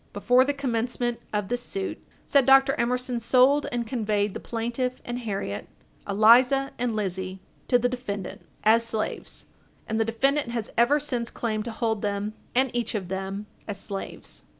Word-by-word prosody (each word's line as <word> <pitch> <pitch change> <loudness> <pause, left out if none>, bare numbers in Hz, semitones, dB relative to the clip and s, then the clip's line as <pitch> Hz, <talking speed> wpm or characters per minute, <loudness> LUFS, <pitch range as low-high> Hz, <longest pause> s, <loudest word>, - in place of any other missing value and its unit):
Before 245 +5 +4
the 280 - +1
commencement 245 -3 -1
of 210 -2 -1
this 245 +2 -1
suit, 390 +9 -4 0.2
said 275 -2 +3
Dr. 270 0 +7
Emerson 250 0 -1
sold 260 +5 +4
and 240 -1 -1
conveyed 210 -4 0
the - - -5
plaintiff, 240 +2 -2
and 240 0 -3
Harriet, 195 - -4 0.4
Eliza, 245 +7 +5
and 240 -2 0
Lizzie, 190 -2 -3 0.3
to 245 - +5
the 245 +1 +1
defendant, 245 -6 -5 0.2
as 225 +2 +5
slaves, 225 -2 -4 0.4
and 220 0 -2
the - - +4
defendant 270 +5 +1
has 235 -2 -3
ever 255 +6 +4
since 245 -5 -2
claimed 215 -2 -2
to 235 - -4
hold 220 -2 -1
them, 205 0 -2 0.2
and 260 0 +3
each 235 -2 -1
of 190 -4 -3
them, 195 +2 -4 0.2
as 205 -2 -5
slaves. 195 0 -6
235 Hz, 165 wpm, -26 LUFS, 210-250 Hz, 0.4 s, Dr